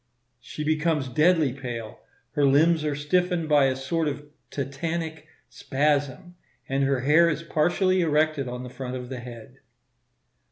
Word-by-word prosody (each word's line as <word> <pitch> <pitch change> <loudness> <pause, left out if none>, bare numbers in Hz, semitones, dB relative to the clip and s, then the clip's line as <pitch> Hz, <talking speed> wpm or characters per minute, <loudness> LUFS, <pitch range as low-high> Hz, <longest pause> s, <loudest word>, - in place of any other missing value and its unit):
She 140 +5 -7
becomes 155 -2 0
deadly 155 0 +3
pale; 120 -5 -7 0.3
her 145 - 0
limbs 155 +4 +4
are 150 -1 -1
stiffened 175 +3 0
by 145 -2 +4
a 130 -1 +1
sort 160 +5 -2
of 145 0 -4 0.3
tetanic 155 +3 -4 0.2
spasm, 145 +3 -1 0.3
and 135 +1 0
her 135 -2 0
hair 160 +5 +5
is 160 +1 -3
partially 180 +4 +1
erected 155 -3 +1
on 125 0 -5
the 125 - -7
front 130 0 -6
of 125 -1 -7
the 130 -2 -5
head. 120 -2 -11
150 Hz, 150 wpm, -25 LUFS, 135-160 Hz, 0.3 s, hair